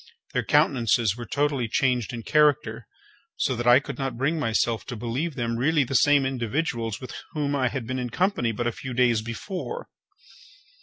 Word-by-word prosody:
Their - - 0
countenances 120 -8 +2
were 120 -1 -8
totally 140 -3 0
changed 125 -1 +1
in 115 -1 -6
character, 150 +1 +2 0.5
so 130 - 0
that 120 +1 -3
I 120 +1 +8
could 145 - -8
not 135 -3 -3
bring 150 +6 0
myself 115 -4 0
to 125 - -5
believe 125 +8 -3
them 115 -2 -2
really 150 +4 +3
the 135 +2 -5
same 145 +2 +4
individuals 120 -3 -2
with 130 - -8 0.2
whom 145 -2 -1
I 130 -2 +2
had 130 -1 -3
been 130 +2 -3
in 125 -1 -3
company 165 - +1
but 120 +2 -3
a 120 - +1
few 130 +2 -7
days 120 -3 +3
before. 185 - -6
130 Hz, 185 wpm, -25 LUFS, 115-145 Hz, 0.5 s, I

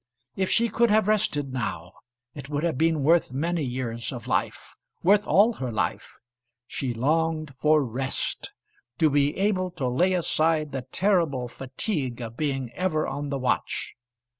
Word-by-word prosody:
If 190 -1 0
she 235 0 +3
could 235 +2 +2
have 215 -1 +3
rested 145 -10 +1
now, 95 -8 -3 0.4
it 140 -1 -9
would 145 +1 -2
have 170 -4 +1
been 160 0 +2
worth 165 -1 +3
many 165 +6 -1
years 120 -3 -3
of 120 -4 -7
life, - - -2 0.3
worth 205 +4 +4
all 215 +5 +5
her 130 - -4
life. 110 - -3 0.5
She 130 0 -3
longed 155 +4 0
for 155 -1 +4
rest, 130 +3 -3 0.5
to 155 -2 +3
be 145 0 +2
able 190 -2 +1
to 135 -5 -1
lay 175 +10 +2
aside 160 -3 +1
the 135 - -3
terrible 170 -10 +1
fatigue 130 - -4
of 115 -1 -6
being 135 -4 -2
ever 170 -2 0
on 145 +1 -4
the 140 - -1
watch. 130 -1 -1
145 Hz, 160 wpm, -26 LUFS, 130-175 Hz, 0.5 s, all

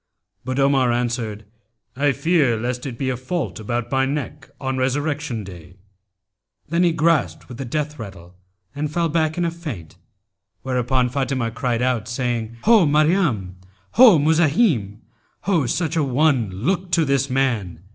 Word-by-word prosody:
But 130 +1 -3
Omar 135 -3 +3
answered, 120 -3 -2 0.5
'I 140 +1 +2
fear 150 -7 +2
lest 125 +3 -3
it 120 -3 -6
be 130 0 -1
a - - -2
fault 130 +4 -4
about 120 +2 -3
my 135 0 +2
neck 140 0 -5
on 130 -1 -2
Resurrection 140 -2 -1
Day.' 90 -2 -12 0.9
Then 170 +2 +1
he 175 -1 +4
gasped 160 -1 +1
with 125 0 -10
the 135 - -4
death 150 +3 -3
rattle 95 -5 -10 0.4
and 145 +1 -3
fell 170 +1 0
back 155 0 0
in 175 - +1
a 170 - 0
faint; 140 - -8 0.7
whereupon 125 -1 0
Fatimah 130 -3 -1
cried 125 -3 -1
out, 125 -4 0
saying, 115 -1 -3
'Ho, 220 -8 +5
Maryam! 150 - +1 0.3
Ho, 235 -8 +7
Muzahim![FN#292] 155 - +2 0.4
Ho, 170 -10 +1
such 160 +3 -1
an 145 -5 0
one! 135 -5 +2
Look 175 - -2
to 165 -1 +3
this 140 0 +1
man!' 115 -11 -1
135 Hz, 155 wpm, -21 LUFS, 120-155 Hz, 0.9 s, Ho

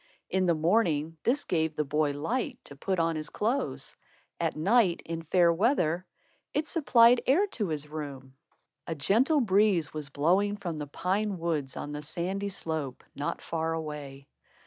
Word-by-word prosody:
In 185 -1 +2
the 170 - +3
morning, 165 -2 +1
this 270 +5 +1
gave 160 -3 0
the 150 - 0
boy 150 0 0
light 240 - -2
to 140 - -10
put 190 +7 -2
on 165 -1 +1
his 155 -1 -4
clothes. 240 +6 -2 0.4
At 165 -2 0
night, 185 +2 +3
in 165 0 -4
fair 170 +1 +3
weather, 180 - +1 0.5
it 300 +1 0
supplied 245 -7 +5
air 330 +10 +4
to 210 -4 -2
his 150 -2 -3
room. 140 -4 -7 0.5
A 165 - -2
gentle 255 - +3
breeze 195 - +3
was 150 -2 -3
blowing 185 +9 +2
from 175 -6 -4
the 145 - -4
pine 195 +6 -1
woods 160 -6 -2
on 145 - -5
the 150 0 -5
sandy 185 +6 -2
slope, 160 -8 -4
not 145 +1 -4
far 165 0 -2
away. 145 -4 -6
165 Hz, 165 wpm, -29 LUFS, 150-205 Hz, 0.5 s, supplied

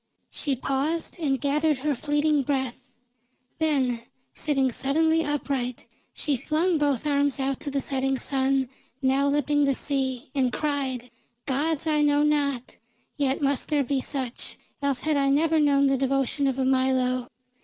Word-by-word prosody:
She 280 -3 -1
paused, 280 +7 -1
and 275 -5 0
gathered 300 +2 +1
her 290 +3 0
fleeting 295 +2 +1
breath. 265 -2 -3 0.7
Then, 265 -7 +1 0.3
sitting 270 -4 +1
suddenly 320 +6 +1
upright, 275 -4 -2 0.3
she 285 -3 -1
flung 320 +6 +1
both 285 -3 +1
arms 285 -1 +1
out 270 0 -1
to - - -4
the 275 0 -1
setting 270 0 0
sun 265 0 +1 0.4
now 270 +2 +3
lipping 290 0 +2
the 275 -1 +2
sea, 265 -1 -2
and 260 -3 +1
cried: 265 -4 -2 0.3
"Gods 295 +3 0
I 305 -1 +2
know 290 0 +3
not. 285 -4 0 0.4
Yet 280 -1 0
must 280 -1 0
there 295 -2 +2
be 270 +1 -1
such, 255 -2 -3 0.2
else 280 -3 0
had 310 -2 +1
I 275 -1 +2
never 315 +3 +3
known 280 -2 +4
the 270 0 +3
devotion 275 +1 +1
of 265 -1 -1
a 265 - +1
Milo! 260 -1 +1
275 Hz, 155 wpm, -26 LUFS, 265-295 Hz, 0.7 s, known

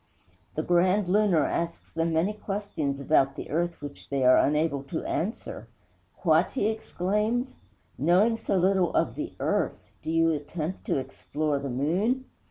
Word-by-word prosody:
The 155 - -1
Grand 185 +3 +3
Lunar 185 -6 +3
asks 170 0 -3
them 165 0 0
many 170 +6 +1
questions 195 -10 -3
about 140 -1 +2
the - - -7
earth 170 0 -1
which 145 -1 -9
they 135 -2 0
are 130 - +7
unable 150 -1 +1
to 160 +4 -4
answer. 180 - -3 0.6
'What?' 165 0 +3
he 260 - 0
exclaims, 220 +4 -1 0.5
'knowing 185 - +4
so 200 - -1
little 185 -1 +3
of - - +2
the - - -5
earth, - - -1
do - - -6
you 165 0 +3
attempt 155 +3 -4
to - - 0
explore 145 +2 -2
the 140 0 -4
moon?' 185 - 0
170 Hz, 155 wpm, -27 LUFS, 150-200 Hz, 0.6 s, are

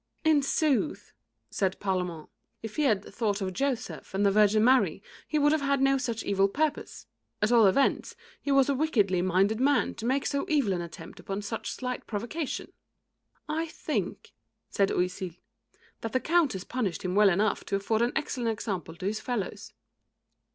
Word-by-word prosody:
"In 315 -2 +4
sooth," 295 +1 0 0.4
said 190 -1 -1
Parlamente, 180 -5 -2 0.3
"if 225 -1 -7
he 305 - +2
had 210 -6 +2
thought 210 -3 -2
of 190 -2 -3
Joseph 265 -4 -3
and 200 +1 +2
the 200 - +5
Virgin 210 +1 +4
Mary, 255 +2 +3 0.2
he 305 - 0
would 295 0 +4
have 310 -1 +2
had 280 0 +1
no 270 0 +3
such 235 -3 -3
evil 195 0 +2
purpose. 300 +8 -2 0.3
At 215 - +1
all 230 -4 +6
events, 270 +8 +1 0.3
he 285 - -2
was 275 -1 +5
a 280 - +2
wickedly 215 - +2
minded 190 +4 +2
man 275 -1 +2
to 225 - -5
make 265 +2 +1
so 280 - -1
evil 280 -11 +2
an 175 - -2
attempt 170 -2 -9
upon 195 +1 -5
such 225 +2 -4
slight 250 -1 -5
provocation." 240 +8 -4 0.7
"I 320 +2 -1
think," 315 - -4 0.4
said 195 -1 +2
Oisille, 180 -1 -2 0.6
"that 225 - -5
the 255 - +3
Countess 305 - +1
punished 220 -8 -3
him 180 -1 -2
well 205 0 +6
enough 200 +4 +1
to 200 - -1
afford 215 +3 0
an 240 +1 +1
excellent 255 -6 -1
example 195 -7 -4
to 185 - -7
his 215 +2 -1
fellows." 240 -7 -4
225 Hz, 175 wpm, -28 LUFS, 195-275 Hz, 0.7 s, all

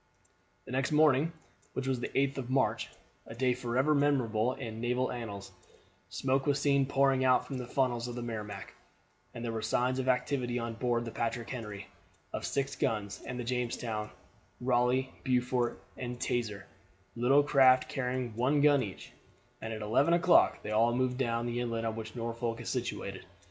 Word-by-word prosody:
The - - -9
next 130 +2 0
morning, 150 0 +4 0.4
which 135 - -3
was 130 -2 0
the - - -2
8th 135 0 0
of 125 -2 -5
March 130 0 +1 0.4
a 115 - -8
date 125 0 +1
forever 125 +5 +2
memorable 130 -5 +2
in 115 -4 -6
naval 125 +1 0
annals 105 -5 -6 0.6
smoke 135 +1 0
was 140 0 +2
seen 140 -2 +3
pouring 135 -1 +3
out 130 -1 +4
from 135 -2 -5
the 125 - -5
funnels 125 -2 0
of 120 - -5
the 120 - -4
Merrimac, 105 -4 -6 0.6
and 115 - -5
there 115 - -2
were 110 -1 -3
signs 125 +4 +1
of 130 - -2
activity 125 -1 0
on 115 -1 -3
board 120 0 0
the 115 - -5
Patrick 115 +1 -3
Henry, 105 -6 -6 0.5
of - - -3
six 140 0 -1
guns, 105 -5 -2
and 125 - -4
the - - -2
Jamestown, 115 -3 -2 0.5
Raleigh, 125 +1 +1
Beaufort, 125 -2 +1 0.2
and 125 -1 -5
Teazer, 105 -6 -2 0.5
little 130 +5 +4
craft 130 -3 +5
carrying 125 -3 -2
one 135 +5 +2
gun 145 -2 +5
each, 100 -6 -7 0.5
and 110 - -4
at 110 -1 -4
eleven 135 +10 +3
o'clock 175 0 +4
they 105 - -4
all 115 +2 +3
moved 125 0 0
down 120 -2 0
the 120 0 -2
inlet 115 -2 -2
on 110 -1 -1
which 110 0 -7
Norfolk 115 0 -3
is 120 - -5
situated. - - -3
125 Hz, 175 wpm, -31 LUFS, 115-130 Hz, 0.6 s, craft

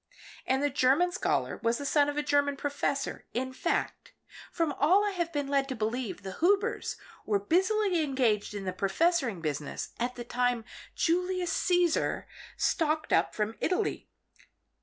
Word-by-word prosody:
And 265 +2 +1
the 290 - +1
German 280 +6 +3
scholar 360 - -1
was 230 0 +1
the 285 - -5
son 290 +1 +3
of 290 - -4
a 295 - +1
German 285 -1 +2
professor. 280 0 -2
In 260 +2 -2
fact, - - -2 0.4
from 330 -4 0
all 370 +9 +5
I 410 - 0
have 345 -3 -2
been 290 -3 -2
led 275 -1 +1
to 260 - -3
believe 225 -1 -3
the 190 -1 -7
Hubers 405 +7 +1 0.3
were 210 - +1
busily 375 - +2
engaged 240 -8 0
in 200 -1 -5
the 185 - -2
professoring 230 - +1
business 150 -1 -3
at 245 +1 -1
the 240 - -6
time 245 -1 0 0.3
Julius 360 +1 0
Caesar 355 -3 +1 0.3
stalked 310 -2 +1
up - - +2
from 215 +1 -1
Italy." 385 +3 -1
285 Hz, 160 wpm, -29 LUFS, 240-345 Hz, 0.4 s, all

